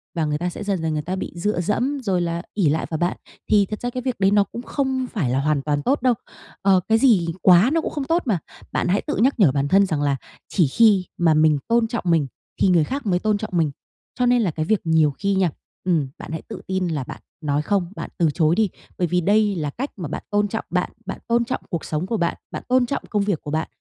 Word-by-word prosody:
và 165 -2 0
người 150 -1 0
ta 175 +3 -2
sẽ 180 - -7
dần 200 -4 -1
dần 160 -1 -1
người 150 - -1
ta 180 +5 -3
bị 190 - -5
dựa 175 +1 -1
dẫm 250 +10 0
rồi 190 -5 +1
là 170 0 -2
ỷ 190 -7 +2
lại 155 +3 0
vào 160 - -2
bạn. 175 +3 -1 0.3
Thì 205 -2 +5
thật 215 +2 -6
ra 245 - -1
cái 250 +1 -4
việc 255 -4 -2
đấy 195 0 +3
nó 205 0 +5
cũng 215 +4 -8
không 260 0 -1
phải 160 - 0
là 130 +2 +1
hoàn 150 0 +1
toàn 145 0 -1
tốt 270 - +1
đâu, 250 0 +4 0.5
ờ, 195 -1 +4
cái 220 - +4
gì 225 -8 +4 0.2
quá 185 +6 +6
nó 330 - +2
cũng - - -4
không 285 -3 -3
tốt 330 +5 +2
mà. 210 -9 +1 0.3
Bạn - - 0
hãy 190 +3 +2
tự 300 - -3
nhắc 260 +2 +2
nhở 180 -10 +6
bản 140 +1 0
thân 195 +6 +5
rằng 155 -6 -1
là 140 -1 +1 0.3
chỉ 175 -7 +3
khi 205 - +4
mà 165 -2 +4
mình 155 -1 +4
tôn 230 0 +3
trọng 235 0 -3
mình 165 -5 +3 0.3
thì - - +5
người 175 -3 +4
khác 275 - -4
mới 180 -3 +2
tôn 215 +1 +1
trọng 215 - -6
mình, 160 -3 +2 0.5
cho 250 - +3
nên 245 0 +4
là 195 -6 +1
cái 155 0 -3
việc 215 +3 +1
nhiều 160 -3 +3
khi 200 +8 -1
nha, 190 -2 +3 0.3
ừm, 165 -6 +1
bạn - - -9
hãy 160 - -4
tự - - -7
tin 190 -1 -1
là 155 -5 -2
bạn - - -9 0.2
nói 145 -1 0
không, 180 +2 0
bạn - - -6
từ 170 -3 +3
chối 160 0 +2
đi. 215 -1 +2 0.3
Bởi 175 - +1
vì 180 +2 +1
đây 205 +2 +3
là 155 -4 -2
cách 260 - -4
mà 175 -5 -4
bạn - - -5
tôn 205 0 +2
trọng 220 +2 -4
bạn, - - -1
bạn - - -5
tôn 235 0 +2
trọng 255 - -3
cuộc 170 -5 -3
sống 155 +3 -2
của 225 +4 -1
bạn, 170 -3 0
bạn - - -6
tôn 255 0 +3
trọng 260 - -3
công 210 -2 +1
việc 200 -6 -1
của 145 - -6
bạn, 160 +1 -1
185 Hz, 275 wpm, -22 LUFS, 160-220 Hz, 0.5 s, quá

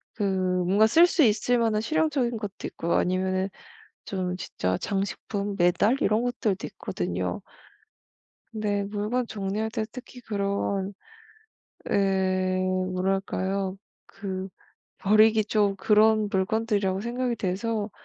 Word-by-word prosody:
그 210 - -2
뭔가 185 +1 +2
쓸 335 +10 +6
수 335 - +3
있을 240 +2 +3
만한 225 -2 +2
실용적인 285 -3 0
것도 205 -3 -6
있고 170 - -3
아니면은 185 +1 +1 0.6
좀 185 -2 -2
진짜 95 - -2
장식품 200 0 -3
메달 180 +7 +3
이런 215 +3 +2
것들도 240 -6 -1
있거든요. - - -3 1.1
근데 210 -2 -1
물건 215 +4 -2
정리할 210 +1 -2
때 220 0 -2
특히 250 0 -10
그런 200 -2 -2 1.0
예 190 -1 +1 0.3
뭐랄까요 190 +1 -1 0.3
그 190 -1 -5 0.5
버리기 215 +2 +5
좀 205 -2 +2
그런 215 +2 +4
물건들이라고 200 -1 0
생각이 240 +2 -2
돼서 210 +2 -2
205 Hz, 245 characters per minute, -26 LUFS, 190-220 Hz, 1.1 s, 쓸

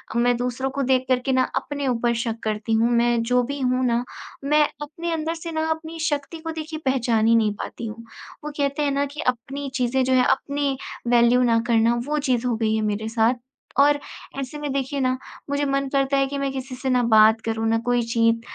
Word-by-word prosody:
अ, - - +1
मैं 245 +1 +3
दूसरों 250 +2 -2
को 280 +1 -2
देख 260 0 +2
कर 255 -1 +3
के 270 - +1
ना 260 0 +4
अपने 285 -1 -2
ऊपर 240 -1 +1
शक 230 -1 -3
करती 215 +1 -2
हूँ। 225 +2 +3
मैं 235 0 +2
जो 250 +2 +2
भी 280 +3 -4
हूँ 255 0 +1
ना 235 0 +1 0.4
मैं 300 +2 +4 0.2
अपने 335 +3 -5
अंदर 325 +1 -2
से 335 0 -6
ना 315 0 -1
अपनी 320 +1 -5
शक्ति 290 +2 -3
को 325 0 -5
देखिए 315 0 -6
पहचान 235 -4 +2
ही 230 - +5
नहीं 215 -2 +2
पाती 230 - -6
हूँ, 230 +2 -8 0.4
वो 300 - -4
कहते 280 +1 0
हैं 285 - +1
ना 280 +1 +1
कि 300 - -5
अपनी 275 +4 -7
चीज़ें 255 0 +1
जो 260 0 +1
हैं 255 -1 +4
अपनी 280 0 0 0.3
वैल्यू 240 +1 +4
ना 230 -2 +3
करना, 230 0 +3
वो 300 0 0
चीज़ 255 -4 0
हो 240 - +1
गई 220 -1 +1
है 220 - 0
मेरे 220 +2 -3
साथ 230 +2 +2 0.5
और 290 0 +4 0.4
ऐसे 275 +2 -5
में 295 -1 -3
देखिए 275 +1 -2
ना 255 - +2 0.4
मुझे 285 0 0
मन 275 0 0
करता 275 0 +2
है 275 0 +2
कि 280 +1 -4
मैं 275 -1 -1
किसी 265 -1 -6
से 260 +1 -3
ना 250 -1 +3
बात 220 -1 +5
करूँ, 225 0 -1
ना 225 - +3
कोई 245 0 +2
चीत 230 0 +2
255 Hz, 230 wpm, -23 LUFS, 235-280 Hz, 0.5 s, ही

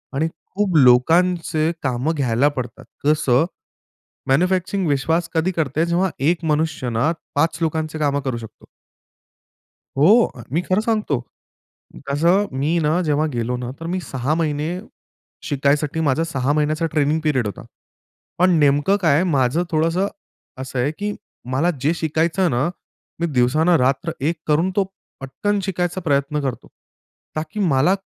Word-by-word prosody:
आणि 155 +4 +1 0.3
खूप 195 -4 +1
लोकांचे 160 +5 +3
कामं 130 +5 0
घ्यायला 130 -1 +2
पडतात. 125 -3 -6 0.2
जसं 150 -1 +3 0.8
मॅन्युफॅक्चरिंग 180 +5 +1
विश्वास 160 +4 +1
कधी 160 +3 +1
करते? 160 -1 0
जेव्हा 175 +2 +1 0.2
एक 170 -1 -2
मनुष्य 155 -4 0
ना 120 +8 +1 0.3
5 160 +3 +1
लोकांचे 160 0 -1
कामं 145 -1 +1
करू 130 -3 -2
शकतो. 110 -2 -12 1.3
हो. 205 - +5 0.2
मी 165 - +1
खरं 185 +3 +1
सांगतो. 215 - 0 0.9
तसं 170 +8 +3
मी 155 +5 +1
ना 160 +4 +2
जेव्हा 150 -1 +1
गेलो 120 +1 -1
ना 125 0 -5
तर 165 - -6
मी 185 - -1
6 135 -1 -2
महिने 155 -2 -1 0.8
शिकायसाठी 145 +2 +1
माझा 140 +5 +2
6 140 -4 -1
महिन्याचा 155 +2 0
ट्रेनिंग 155 +1 +1
पीरियड 135 -7 +1
होता. 100 - -7 0.7
पण 185 +1 +5
नेमकं 145 +7 +3
काय 160 -5 +4
आहे, 170 - +3
माझं 145 -1 +1
थोडंसं 165 +5 +1 0.5
असं 130 -1 -4
आहे 135 +4 +1
की 210 0 -2 0.4
मला 145 +7 +2
जे 155 +4 +2
शिकायचं 160 +2 0
आहे 180 - +3
ना 135 +5 +1 0.5
मी 170 - +1
दिवसानं 155 +8 +3
रात्र 135 +5 +1 0.2
एक 170 - -3
करून 160 +5 +2
तो 200 - +3 0.4
पटकन 200 +10 -2
शिकायचा 180 -1 -2
प्रयत्न 145 -1 0
करतो. 135 -3 -4 0.7
कारण 155 +1 -2
की 215 - -4
मला 140 +7 +3
155 Hz, 145 wpm, -21 LUFS, 140-170 Hz, 1.3 s, हो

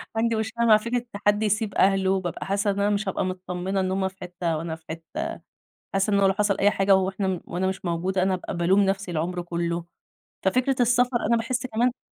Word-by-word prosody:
عندي 230 0 +1
مشكلة 220 +2 -1
مع 215 -2 +7
فكرة 235 +2 -2 0.2
حد 205 +1 +3
يسيب 210 0 0
أهله، 195 -1 +3
وبابقى 185 -3 -2
حاسّة 200 +1 0
إن 200 - -3
أنا 205 +1 +2
مش 205 -1 0
هابقى 190 - -1
متطمنة 185 +1 -3
إن 185 0 0
هُم 190 0 0
في 190 - -9
حتّة 175 -2 -2
وأنا 160 0 -4
في 160 - -19
حتّة، 160 -1 -5 0.6
حاسّة 195 +2 +1
إنّه 200 -1 +4
لو 190 - +3
حصل 200 -1 +1
أي 205 +1 +4
حاجة 195 0 +4
وإحنا 190 -1 -1
وأنا 180 +2 -2
مش 190 -1 -4
موجودة 185 +2 0
أنا 190 0 +2
هابقى 180 -1 -4
بالوم 185 +4 +3
نفْسي 195 -1 0
العمر 175 +2 -2
كلّه، 170 0 -2 0.6
ففكرة 255 +6 +2
السفر 245 +1 +3
أنا 235 - +4
باحس 250 +3 -2
كمان 245 +2 0
195 Hz, 205 wpm, -25 LUFS, 180-215 Hz, 0.6 s, مع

